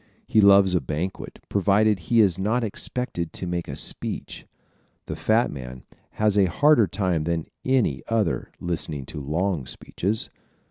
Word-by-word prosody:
He 110 - +3
loves 100 -2 +6
a 90 - +2
banquet, 80 +8 -5
provided 105 +1 +2
he 115 +7 +3
is 95 -4 +2
not 110 +5 0
expected 105 -5 -3
to - - -5
make 85 -1 -3
a - - -5
speech. - - -2 0.6
The - - -5
fat 110 +2 +1
man 65 -2 -8 0.3
has 105 -1 +2
a 100 - +5
harder 120 - +4
time 90 -4 -1
than 85 -1 -1 0.2
any 125 - +1
other 115 -2 0
listening 80 -5 -3
to 75 - -7
long 80 0 -1
speeches. 100 - -3
95 Hz, 150 wpm, -24 LUFS, 80-110 Hz, 0.6 s, loves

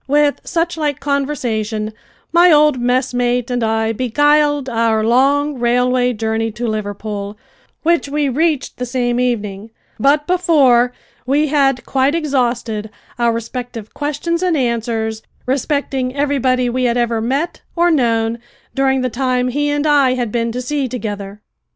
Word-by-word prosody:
With 290 +1 +2
suchlike 330 -4 -1
conversation 235 -7 -2 0.4
my 345 +1 +6
old 300 -3 +4
mess 250 +1 0
mate 245 0 0
and 245 -1 0
I 225 0 +1
beguiled 290 +4 +2
our 225 -2 +1
long 275 +4 +2
railway 250 +1 +2
journey 225 0 -1
to 240 +2 -4
Liverpool, 205 -1 -4 0.5
which 335 -3 +2
we 295 0 0
reached 305 +2 0
the 250 - -3
same 245 -1 0
evening, 215 -4 -2 0.3
but 290 +5 +3
before 285 -9 +3 0.4
we 290 +3 +2
had 270 -3 +2
quite 270 +3 +1
exhausted 240 -8 -1 0.3
our 235 -1 +3
respective 230 -1 -6
questions 300 +4 -2
and 360 -4 +1
answers 225 -3 -1 0.2
respecting 265 -1 -1
everybody 265 -3 +1
we 250 +1 0
had 240 0 +1
ever 235 -2 0
met 275 +9 -2
or 345 0 +3
known 230 -5 +1 0.3
during 265 -1 +1
the 255 - 0
time 250 0 0
he 290 +3 0
and 290 +1 0
I 280 -4 +4
had 240 -4 -2
been 230 0 -1
to 250 +1 -4
sea 280 +1 -1
together. 205 -4 -6
255 Hz, 145 wpm, -17 LUFS, 230-290 Hz, 0.5 s, my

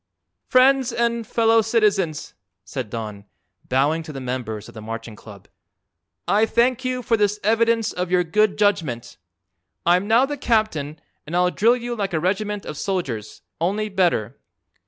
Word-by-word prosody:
"Friends 260 0 +4
and 235 -1 -1
fellow 225 0 +3
citizens," 205 -8 0 0.3
said 115 +4 -5
Don, 105 -3 -6 0.4
bowing 145 +5 +2
to 160 -1 -9
the 135 - -7
members 125 -5 -4
of - - -13
the 110 - -9
Marching 115 0 -7
Club, 100 -2 -14 0.8
"I 210 +2 +3
thank 245 +3 +2
you 255 -1 -2
for 235 -2 +2
this 210 0 +1
evidence 225 +1 +2
of 180 0 -3
your 180 0 +3
good 210 +4 +1
judgment. 165 - 0 0.7
I'm 180 +3 +3
now 230 +4 +5
the 290 +1 -5
captain 190 - 0 0.3
and 165 - -4
I'll 180 0 +3
drill 235 +6 +3
you 240 0 -4
like 200 -4 -3
a 160 - +1
regiment 205 +4 -2
of 150 - -6
soldiers, 135 - -4 0.2
only 205 +5 0
better. 180 - 0
195 Hz, 155 wpm, -22 LUFS, 145-225 Hz, 0.8 s, now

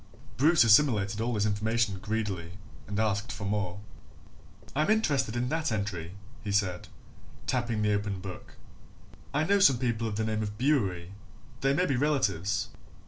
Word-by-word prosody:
Bruce 155 +4 +5
assimilated 110 -4 +4
all 120 +1 -1
this 105 0 +1
information 105 -1 0
greedily 100 -5 -3 0.3
and 100 +1 -3
asked 105 0 0
for 100 - -6
more. 100 -2 -2 1.0
"I'm 155 +5 +1
interested 145 - +2
in 120 +1 -1
that 160 -3 -1
entry," 95 -5 -3 0.3
he 105 - -3
said, 95 -4 0 0.6
tapping 120 -4 -1
the 105 0 +2
open 100 -1 -2
book. 95 0 -9 0.8
"I 145 +3 +1
know 200 +5 +3
some 140 -10 +6
people 115 -2 -1
of 105 - -3
the 110 +1 -1
name 110 0 -1
of 105 -1 -4
Bewery 100 - 0 0.5
they 135 +1 +2
may 180 +4 +2
be 135 -7 0
relatives." 100 - 0
110 Hz, 155 wpm, -29 LUFS, 100-130 Hz, 1.0 s, some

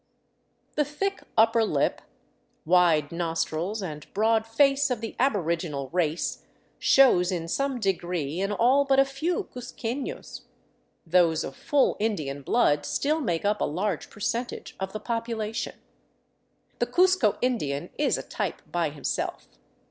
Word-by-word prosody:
The 300 - +2
thick 390 +8 -3 0.2
upper 225 +1 +5
lip, 150 -10 0 0.6
wide 165 -4 +4
nostrils, 170 +4 -2
and 150 -4 -7
broad 220 +1 +2
face 275 +4 +3
of 250 -3 -1
the 225 -1 -6
aboriginal 170 - 0
race 165 0 -1 0.4
shows 195 -10 +5
in 170 -2 -3
some 275 +7 -1
degree 175 -6 -1
in 195 +1 0
all 250 +7 +4
but 275 -1 +2
a 270 - +6
few 315 +9 -2
cuzquefios; 250 +1 -5 0.6
those 165 -2 +3
of 135 - -6
full 285 -2 +2
Indian 155 -11 -2
blood 145 - +2
still 305 +3 0
make 175 - -1
up 210 +1 +1
a - - +3
large 180 +3 -2
percentage 235 +3 -4
of 190 0 -3
the 215 - -5
population. 230 0 -3 1.0
The - - +1
Cuzco 365 - +3
Indian 170 - -1
is 295 - +2
a - - -5
type - - -4
by 170 -3 0
himself. 145 -1 -3
210 Hz, 135 wpm, -26 LUFS, 170-250 Hz, 1.0 s, a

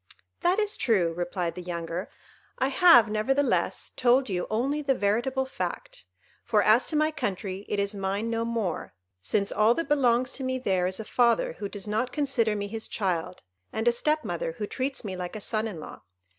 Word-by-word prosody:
"That 360 +2 +3
is 420 -1 0
true," 185 -8 +2
replied 175 0 -2
the 180 - -7
younger; 170 +1 -4 0.5
"I 265 +1 +1
have, 265 -6 +7
nevertheless, 260 +7 0
told 255 0 +3
you 180 -2 -2
only 270 +7 0
the 275 -2 +1
veritable 240 +6 0
fact; - - -5 0.4
for - - +2
as - - +4
to 315 - -2
my 305 +1 +3
country, 195 -6 -4
it 205 - -1
is 200 +1 0
mine 200 +2 -2
no 230 0 0
more, 230 -7 -3 0.3
since 200 - 0
all 220 +3 +4
that 330 - -2
belongs 255 -3 +3
to 270 - -5
me 260 0 -1
there 190 -7 +1
is 185 +3 -4
a 220 - -5
father 235 -5 +2
who 200 +4 -6
does 205 0 -5
not 220 +5 -1
consider 265 -7 +1
me 205 -1 -2
his 220 +1 -5
child, 180 -3 -2 0.3
and 220 +2 -2
a - - +7
step 305 +6 0
mother 170 -2 -3
who 210 +5 -4
treats 265 +3 -4
me 190 -2 -4
like 180 +2 -5
a - - -4
son 215 +1 -2
in 190 -7 -6
law. - - -10
220 Hz, 200 wpm, -27 LUFS, 195-265 Hz, 0.5 s, have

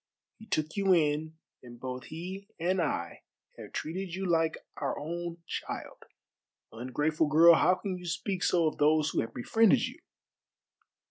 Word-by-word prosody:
He 220 - -13
took 155 -5 -1
you 195 -2 +3
in, 155 0 0 0.2
and 120 -1 -12
both 130 0 -5
he 185 +5 -7
and 180 +2 +1
I 85 - -2 0.4
have - - -9
treated 175 +2 -4
you 190 +1 -3
like 165 -2 +2 0.2
our 140 - -2
own 170 +2 -5
child. - - -6 0.7
Ungrateful 150 +7 0
girl, 165 +3 +8
how 180 +3 +4
can 185 0 -4
you 180 - -9
speak 180 +2 -2
so 170 -2 +3
of 155 - -1
those 150 0 +3
who - - +1
have 115 - -5
befriended 220 - +3
you?" - - -8
165 Hz, 155 wpm, -30 LUFS, 150-180 Hz, 0.7 s, girl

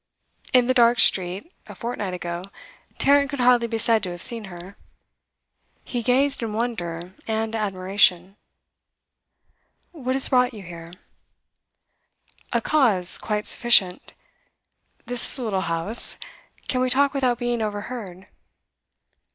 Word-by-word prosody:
In 250 -1 +3
the 255 - 0
dark 240 -1 +3
street, 190 - +2
a - - -12
fortnight 210 -6 -5
ago, 175 0 -6 0.5
Tarrant 280 0 +2
could 280 - -6
hardly 245 -1 +3
be 225 0 -4
said 225 -1 +1
to 185 - -5
have 175 -1 -8
seen 230 -3 +3
her; 185 +1 -12 1.1
he 245 - -5
gazed 270 +4 +1
in 225 -2 -5
wonder 180 -7 -5
and 220 0 -3
admiration. 190 -2 0 1.6
'What 260 -6 -4
has 270 - +1
brought 250 -1 +1
you 205 - -10
here?' 170 -1 -12 1.6
'A - - 0
cause 220 -12 +2
quite 210 -1 -4
sufficient. 200 -7 +2 0.9
This 245 0 +5
is - - +5
a 255 - -5
little 200 -5 -2
house; 165 +6 +3 0.5
can 255 - -1
we 255 - 0
talk 280 +2 +1
without 255 -3 -1
being 240 -1 -3
overheard? 205 -3 -7
225 Hz, 130 wpm, -22 LUFS, 185-250 Hz, 1.6 s, This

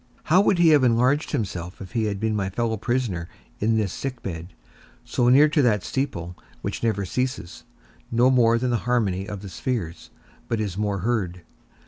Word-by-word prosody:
How 180 +5 +4
would 200 -2 +3
he 170 -1 +5
have 150 -4 +5
enlarged 125 +5 +3
himself 90 -5 -4
if 95 - -9
he 115 -2 0
had 100 -2 -2
been 110 0 0
my 100 -2 -1
fellow 115 +3 -1
prisoner 110 -7 -2 0.3
in 110 +2 +2
this 105 -4 -1
sick 130 -3 -5
bed, 85 -3 -5 0.6
so 120 0 +1
near 140 +4 +7
to 150 0 +2
that 105 -7 +2
steeple 90 -11 -3 0.3
which - - -3
never 105 -4 0
ceases, 125 -5 -3 0.5
no 120 +3 +4
more 115 -2 +4
than 125 +1 -1
the 120 - +2
harmony 100 -6 +1
of 105 -1 -6
the - - -6
spheres, 90 -5 -4 0.4
but 115 - -1
is 100 -4 -2
more 100 -2 -1
heard. 95 -6 -1
115 Hz, 185 wpm, -24 LUFS, 95-125 Hz, 0.6 s, near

